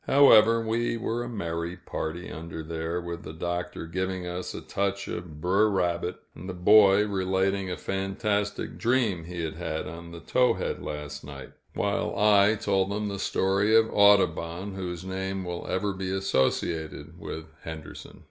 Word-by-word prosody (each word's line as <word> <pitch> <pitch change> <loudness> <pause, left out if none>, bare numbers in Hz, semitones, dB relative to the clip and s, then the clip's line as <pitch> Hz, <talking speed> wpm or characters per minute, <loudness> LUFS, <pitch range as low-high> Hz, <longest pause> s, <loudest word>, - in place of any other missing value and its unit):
However, 115 -5 +7
we 115 +1 0
were 115 +1 -2
a 120 - -6
merry 85 -5 -3
party 85 0 -5
under 80 0 -6
there, 80 +2 -3
with 85 -1 -6
the - - -8
Doctor 85 +1 -4
giving 95 +2 -3
us 90 +1 -5
a - - -5
touch 100 0 -2
of 80 -4 -6
"Br'er 95 +6 +3
Rabbit," 90 -2 0 0.2
and 90 +4 -9
the 90 - -4
boy 100 +2 +6
relating 95 -1 0
a 90 - -3
fantastic 100 +2 -2
dream 115 -8 +1
he 85 0 -5
had 80 -1 -4
had 80 -2 -3
on 85 +1 -9
the 85 - -8
Towhead 125 0 +1
last 75 -2 -6
night; 70 -2 -9 0.2
while - - -1
I 105 0 +5
told 95 -2 +1
them 105 +1 -2
the 100 -1 -4
story 100 +4 +2
of 110 0 +5
Audubon, 95 -2 +3
whose 90 -2 -5
name 95 0 -3
will 90 -1 -5
ever 100 +2 0
be 95 0 -4
associated 80 -2 -1
with 80 -1 -6 0.2
Henderson. 80 -2 -9
95 Hz, 160 wpm, -27 LUFS, 85-100 Hz, 0.2 s, However